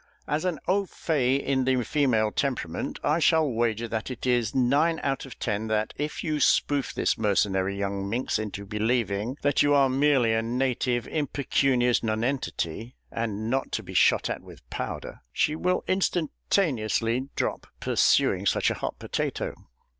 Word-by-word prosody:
As 155 +4 -1
an 180 -4 0
au 195 +1 +2
faït 140 -6 0
in 135 -1 +1
the 130 -1 +2
female 115 -5 +2
temperament, 120 - -2
I 150 +3 +2
shall 160 -1 +4
wager 115 -2 0
that 110 +2 -3
it 130 -1 -6
is 120 -3 +1
nine 145 +6 +3
out 135 -1 -1
of 125 - -11
ten 110 -1 -2
that 110 0 0
if 150 +1 -4
you 155 -2 -1
spoof 140 +1 +2
this - - 0
mercenary 100 -2 +1
young 100 0 -2
minx 120 0 -1
into 100 -2 -5
believing 110 +2 -1
that 145 -1 +3
you 145 0 +4
are 135 -1 +4
merely 135 -4 +3
a 110 - +2
native 120 0 0
impecunious 135 -4 +1
nonentity, 115 - -2 0.2
and 110 -2 -3
not 130 +3 -1
to - - -1
be - - -9
shot - - +4
at - - -3
with - - -15
powder, - - -5
she 155 - +1
will 180 +3 0
instantaneously 140 - 0
drop - - -2
pursuing - - +2
such - - +2
a - - -5
hot - - -3
potato." - - -3
125 Hz, 160 wpm, -26 LUFS, 110-145 Hz, 0.2 s, shall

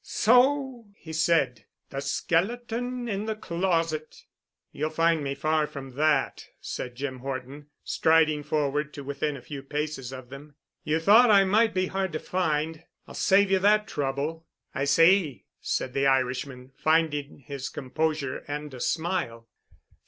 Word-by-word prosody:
"So," 250 0 +2
he 160 - -10
said, 155 -9 +1 0.3
"the 135 - -4
skeleton 235 - -1
in 205 -1 -2
the 220 0 -2
closet!" 165 -5 -2 0.5
"You'll 155 +2 -2
find 165 0 +2
me 140 0 -2
far 155 +2 +1
from 135 -2 -8
that," 145 +1 0
said 125 -1 -6
Jim 130 0 -4
Horton, 135 +2 -6 0.2
striding 160 -2 +3
forward 150 0 -1
to 145 - -7
within 140 +1 -3
a 125 - -13
few 140 +1 -7
paces 145 -2 -4
of 130 -2 -9
them. 140 +2 -11 0.3
"You 155 +1 0
thought 220 +8 +6
I 200 -2 +7
might 215 +2 +2
be 185 0 +2
hard 190 -2 -2
to 155 - -2
find. 160 -3 -1 0.2
I'll - - -11
save 200 0 +3
you 190 - +4
that 210 +2 +3
trouble." 145 +3 -3 0.3
"I 135 - -1
see," 165 0 +3
said 130 - -2
the 140 0 +2
Irishman, 130 0 -1
finding 155 -3 +1
his 140 -1 -5
composure 145 0 -2
and 145 0 -5
a 125 - -8
smile. 160 -9 -2
155 Hz, 150 wpm, -27 LUFS, 140-185 Hz, 0.5 s, I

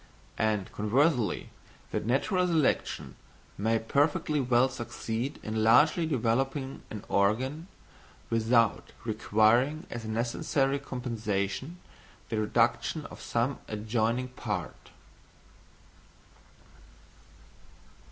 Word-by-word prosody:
And 105 -3 0
conversely, 120 - +1 0.4
that - - -2
natural 180 - +2
selection 160 -5 0 0.4
may 110 +3 +1
perfectly 145 +5 +1
well 125 0 +4
succeed 120 0 -4
in 110 0 -1
largely 155 +9 +5
developing 135 +1 -1
an 105 - -7
organ 130 - +1 0.6
without 115 -1 +2
requiring 115 - +2
as 120 -1 -5
a - - -6
necessary 135 +5 0
compensation 115 - -3 0.5
the 110 - -1
reduction 120 +7 +1
of - - -10
some 120 +3 -1
adjoining 110 +3 -1
part. 105 -8 -5
120 Hz, 85 wpm, -29 LUFS, 110-135 Hz, 0.6 s, largely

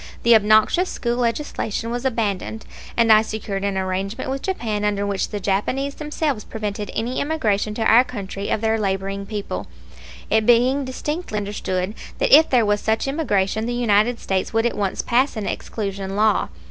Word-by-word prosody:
The 235 - +6
obnoxious 215 - +4
school 235 -1 -2
legislation 230 -2 -2
was 245 +2 -3
abandoned, 220 -3 -2 0.3
and 230 -1 +4
I 215 - +7
secured 210 -3 -4
an 200 -1 -1
arrangement 190 +5 -2
with 270 0 -3
Japan 220 - -2
under 205 -1 0
which 200 -1 -1
the 205 - -4
Japanese 230 +9 -1
themselves 300 -6 -2
prevented 210 -1 -5
any 240 +3 -2
immigration 215 -9 0
to 225 - -1
our 230 +3 +6
country 200 -5 -6
of 210 - 0
their 225 0 +1
laboring 195 0 -2
people, 205 -1 -4 0.6
it 220 0 +2
being 255 +4 +4
distinctly 295 0 -4
understood 200 -2 -2 0.2
that - - +6
if 315 +2 +6
there 245 -4 +4
was 205 0 +1
such 220 +4 0
emigration 220 -7 0
the 240 - -2
United 230 0 +2
States 190 -1 -1
would 225 +1 +1
at 240 - 0
once 200 -2 -1
pass 255 +1 +1
an 210 - -3
exclusion 195 -3 -4
law. 215 +1 +2
220 Hz, 170 wpm, -22 LUFS, 200-245 Hz, 0.6 s, I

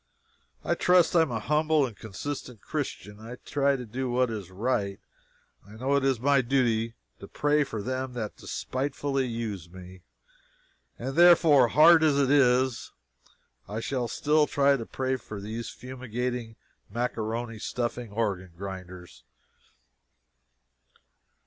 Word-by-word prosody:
I - - +1
trust 180 -1 +3
I 170 - +7
am 160 - +1
a 115 -2 -2
humble 150 +4 +2
and 120 -5 -7
a - - -27
consistent 120 +2 -6
Christian. 105 +1 -5
I 115 +3 -8
try 140 +2 0
to 125 -2 -6
do 130 +4 -4
what 125 0 +1
is 105 -5 -6
right. 100 -1 -2 0.6
I 100 - -15
know 130 +5 0
it 140 - +2
is 135 -3 +1
my 140 +2 +3
duty 115 -3 +1 0.2
to 100 - -10
"pray 150 +5 +1
for 110 -6 -5
them 130 +1 -3
that 110 -4 -5
despitefully 135 0 -2
use 110 -7 -5
me;" 90 0 -12 1.0
and 135 +3 -5
therefore, 165 -6 +6
hard 160 +6 +7
as 150 -3 +3
it 140 -1 +2
is, 130 -3 +3 0.8
I 105 +2 -3
shall 125 0 -2
still 150 +5 +2
try 140 0 +3
to 115 -4 -5
pray 130 0 -2
for 110 -3 -9
these 110 +3 -5
fumigating, 125 -2 -5 0.4
maccaroni 115 0 -3
stuffing 120 -1 -3
organ 100 -5 -2
grinders. 90 -8 -9
125 Hz, 140 wpm, -27 LUFS, 110-140 Hz, 1.0 s, I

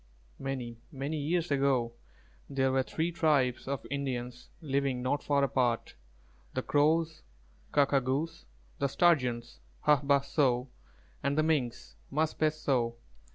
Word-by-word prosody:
Many, 125 -4 -4
many 140 +2 -3
years 165 +3 0
ago 135 -4 +2 0.6
there 135 -1 +1
were 130 0 +3
three 160 +6 -2
tribes 145 -8 +2
of 140 -1 -3
Indians 125 -3 -3
living 140 -4 -1
not 145 +3 0
far 140 -1 +2
apart: 125 -3 +1 0.6
the 130 - -1
Crows, 160 +2 +2 0.5
Kā 145 -1 +5
kā 140 -1 +2
gūs, 150 +6 -2 0.3
the 140 - +2
Sturgeons 125 -8 +2 0.3
"Hā 150 -1 +5
bāh 140 0 +3
so," 130 -4 +1 0.5
and 140 +2 0
the 155 - +4
Minks, 140 -7 -1
"Mūs 155 +3 0
bes 155 0 +1
so." 120 -5 +1
140 Hz, 135 wpm, -31 LUFS, 125-150 Hz, 0.6 s, Kā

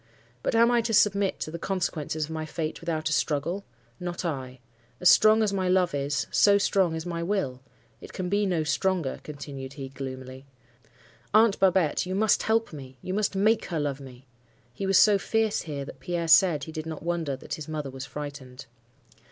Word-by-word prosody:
But - - -1
am 235 +1 +5
I 240 -1 +3
to 225 -1 0
submit 200 -1 +2
to 155 - -4
the 170 - -6
consequences 160 -5 -2
of 160 - -11
my 160 0 -3
fate 155 0 -4
without 160 -2 -2
a - - 0
struggle? 165 +8 -1 0.4
Not 175 0 -4
I. 130 -5 -4 0.4
As 180 - +6
strong 215 +1 +6
as 205 -2 0
my 190 -2 0
love 180 -2 +2
is, 140 0 -1
so 200 -1 +5
strong 190 -4 +2
is 160 +1 -5
my 170 -1 -3
will. 170 -9 -2 0.4
It - - -10
can 185 - -4
be 205 +2 +1
no 170 -4 0
stronger,' 165 0 -1
continued 140 -2 -8
he, 135 -2 -7
gloomily. 130 0 -8 0.9
'Aunt 220 -1 +5
Babette, 185 -3 +2
you 185 - -2
must 215 +1 +3
help 225 -4 0
me—you 135 +4 -8
must 205 0 0
make 215 +3 +2
her 170 -4 -3
love 145 -2 -2
me.' 130 -1 -12 0.5
He 195 - -4
was 195 -1 +4
so 205 -2 +6
fierce 220 0 0
here, 145 -4 -5
that 135 - -11
Pierre 170 +1 -3
said 160 -2 +5
he 160 - -7
did 155 0 -6
not 160 -1 -6
wonder 165 -5 -1
that 130 - -8
his 155 -1 -6
mother 150 -3 -4
was 135 0 -7
frightened. 145 -4 -8
165 Hz, 195 wpm, -27 LUFS, 140-195 Hz, 0.9 s, As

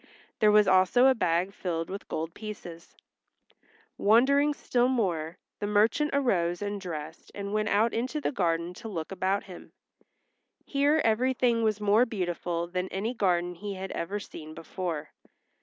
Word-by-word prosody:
There 215 -1 +5
was 210 -1 +5
also 190 +7 +5
a 265 - +7
bag 180 -3 0
filled 165 -4 -3
with 195 - -6
gold 165 +1 -4
pieces. 180 -6 -9 1.0
Wondering 275 +7 +4
still 245 -2 +1
more, 180 -10 -1 0.2
the 205 - -2
merchant 220 +8 +2
arose 180 -11 +1
and 205 -1 -4
dressed 160 -3 -7
and 200 0 -5
went 215 0 0
out 220 +3 +2
into 255 +6 -2
the - - -1
gardens 175 - -1
to 230 - -7
look 170 -6 -5
about 195 +1 0
him. 185 -3 -12 0.9
Here 285 +2 +2
everything 240 +1 +2
was 215 -1 +1
more 210 +4 +4
beautiful 175 -4 -2
than 180 +1 -3
any 205 +6 -3
garden 180 -5 +1
he 200 +3 -6
had 190 0 -6
ever 195 +5 -3
seen 155 -5 -10
before. 165 -3 -5
200 Hz, 155 wpm, -28 LUFS, 175-225 Hz, 1.0 s, a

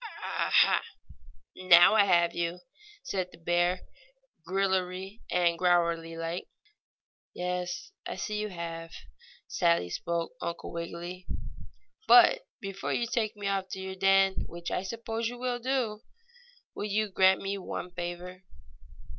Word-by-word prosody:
"Ah - - -1
ha! - - +5 0.7
Now 175 0 +7
I 210 -2 +6
have 170 -3 +3
you!" 170 +1 -2 0.4
said 185 -8 -2
the - - -15
bear, 175 +2 +1 0.6
grillery 190 +2 -1
and 170 -1 +2
growlery 170 -2 +2
like. 165 +2 -4 0.9
"Yes, 180 - -3 0.2
I - - -4
see 210 0 -3
you 215 - -2
have," 165 -2 -6 0.6
sadly 85 +1 +1
spoke 170 - -2
Uncle 170 - -5
Wiggily. 170 +2 -6 0.8
"But - - +8 0.2
before 195 -1 -4
you 240 - 0
take 220 -1 -1
me 205 - -6
off 195 -1 -1
to 190 - -5
your 190 0 -5
den, 195 0 +3
which 170 0 -7
I - - 0
suppose 225 +3 -3
you 245 - -8
will 245 0 -2
do, 240 -4 -1 0.7
will - - -4
you 210 +1 0
grant 190 -1 +4
me 195 0 -2
one 180 -1 -5
favor?" 175 +1 -6
185 Hz, 135 wpm, -29 LUFS, 170-200 Hz, 0.9 s, But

